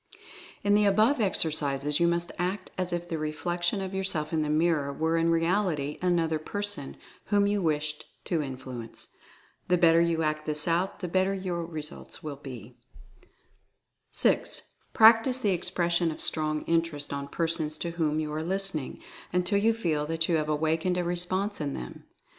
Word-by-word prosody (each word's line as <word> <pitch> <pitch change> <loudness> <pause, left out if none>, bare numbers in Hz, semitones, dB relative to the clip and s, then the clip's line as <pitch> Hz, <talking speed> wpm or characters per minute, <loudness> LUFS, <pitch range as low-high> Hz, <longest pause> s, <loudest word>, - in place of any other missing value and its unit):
In 205 - +3
the 210 0 +4
above 215 +6 +3
exercises 150 -6 +1
you 170 - +4
must 170 0 0
act 185 +2 -2
as 185 -1 -2
if 175 0 -3
the 165 -2 -3
reflec 155 +3 -3
tion 175 +3 +1
of 190 0 -5
yourself 170 -5 -1
in 160 - +1
the 150 - -1
mirror 155 -2 +1
were 160 +3 0
in 165 0 +2
reality 165 -3 0
an 180 -1 +2
other 160 -1 0
person 205 -3 -4 0.3
whom 205 -1 +2
you 205 0 +1
wished 150 -2 -1 0.2
to 165 -4 0
influence. 130 -4 -7 0.6
The 180 - +3
bet 170 -2 +5
ter 165 - +5
you 165 -1 +1
act 155 0 -2
this 150 +1 0
out, 175 +5 0
the 180 - -2
better 190 +2 +1
will 190 - -6
your 175 -2 -2
results 155 -2 -7 0.2
be. 125 -4 -10 1.3
6. - - +1 0.3
Practice 225 +3 +6
the 215 -6 +1
expression 175 -1 +1
of 155 - -6
Strong 155 -1 +1
Interest 165 -4 -1
on 140 0 -4
persons 160 -1 -1
to 170 - -3
whom 155 -2 0
you 155 -1 -3
are 155 - -2
listening, 190 -5 -2 0.3
until 180 +3 +2
you 225 +3 +3
feel 160 -10 -1
that 165 +1 0
you 170 - +2
have 155 -1 -2
awakened 160 +4 0
a 180 - 0
response 180 +3 0
in 140 -2 -2
them. 60 - -8
165 Hz, 175 wpm, -28 LUFS, 155-185 Hz, 1.3 s, Practice